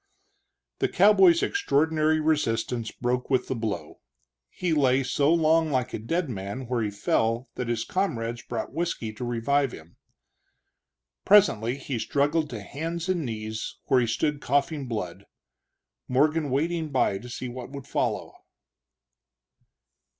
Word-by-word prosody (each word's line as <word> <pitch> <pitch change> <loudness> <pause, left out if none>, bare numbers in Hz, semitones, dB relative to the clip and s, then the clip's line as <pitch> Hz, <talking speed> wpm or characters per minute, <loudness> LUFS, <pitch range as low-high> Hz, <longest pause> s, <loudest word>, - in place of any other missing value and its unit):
The - - +1
cowboy's 190 -3 +5
extraordinary 160 - +2
resistance 120 -7 0
broke 125 +1 -2
with 130 -2 +1
the 130 - -2
blow; 110 -3 -4 0.5
he 175 - -2
lay 135 -3 +3
so 140 +3 +2
long 160 -1 +3
like 125 -2 -1
a - - -3
dead 165 +10 -1
man 105 +2 -5
where 120 -1 -1
he 105 - 0
fell 115 +4 0
that 125 - -4
his 115 -1 -1
comrades 120 -10 -2
brought - - -5
whisky 160 -10 -2
to 105 - -7
revive 125 +3 0
him. 80 +2 -13 1.3
Presently 135 - +4
he 135 -3 -4
struggled 145 +5 +1
to 110 -4 -6
hands 165 - -4
and 180 -3 +1
knees, 110 -1 -5
where 130 - +5
he 120 - 0
stood 145 +5 -1
coughing 145 +1 0
blood, 100 -4 -5 0.8
Morgan 150 +3 +2
waiting 160 +4 0
by 125 -8 +1
to 125 - -10
see 125 +1 -5
what 125 0 -7
would 140 -2 -8
follow. - - -2
130 Hz, 140 wpm, -26 LUFS, 115-155 Hz, 1.3 s, cowboy's